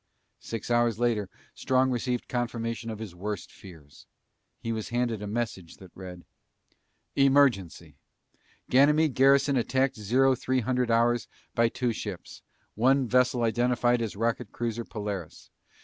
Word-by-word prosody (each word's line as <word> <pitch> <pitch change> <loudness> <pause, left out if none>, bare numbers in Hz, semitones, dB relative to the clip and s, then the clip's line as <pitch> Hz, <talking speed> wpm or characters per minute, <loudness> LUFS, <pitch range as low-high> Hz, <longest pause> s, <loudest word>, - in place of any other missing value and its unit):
Six 115 +1 -6
hours 120 -2 +2
later 115 -5 0 0.2
Strong 130 0 +1
received 125 0 -2
confirmation 115 -2 -3
of 110 - -5
his 110 -4 -8
worst 100 +2 -5
fears. 80 -7 -15 0.5
He 115 - -4
was 110 -2 -4
handed 120 -3 -1
a 105 - -5
message 100 -6 -4
that 95 -2 -14
read: 90 -2 -10 0.9
EMERGENCY: 115 - +2 0.7
GANYMEDE 150 +3 +4
GARRISON 135 +1 +4
ATTACKED 130 +2 0
ZERO 130 +6 +3
THREE 130 +1 -1
HUNDRED 125 +1 0
HOURS 120 0 +2 0.3
BY 115 0 +3
TWO 125 -1 -1
SHIPS. 100 -4 -7 0.3
ONE 130 +3 +3
VESSEL 125 0 +2
IDENTIFIED 120 +1 +2
AS 110 -3 -3
ROCKET 115 +1 -2
CRUISER 115 -1 -3
POLARIS. 100 -6 -6
120 Hz, 135 wpm, -27 LUFS, 105-125 Hz, 0.9 s, GANYMEDE